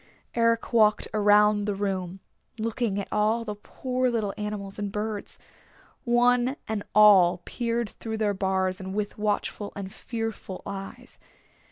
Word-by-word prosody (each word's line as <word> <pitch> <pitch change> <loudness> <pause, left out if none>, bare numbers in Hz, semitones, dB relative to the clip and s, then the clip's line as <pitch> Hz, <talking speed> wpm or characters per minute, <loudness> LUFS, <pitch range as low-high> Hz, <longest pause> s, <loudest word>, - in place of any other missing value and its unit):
Eric 230 0 +1
walked 215 -2 +4
around 210 0 +4
the 205 -1 -1
room, 190 -2 -3 0.4
looking 225 -2 -1
at 200 - -4
all 220 +2 +1
the 210 - -3
poor 255 +4 -2
little 220 -4 -1
animals 210 -1 -5
and 205 -1 -3
birds. 210 0 -4 0.7
One 245 +2 +3
and 220 -1 -2
all 190 -4 +6
peered 235 -2 -2
through 220 +2 -6
their 210 -2 +1
bars 190 0 0
with 205 +3 -4
watchful 210 0 -1
and 195 -1 -6
fearful 225 -5 -5
eyes. 195 -1 -7
210 Hz, 135 wpm, -26 LUFS, 200-230 Hz, 0.7 s, all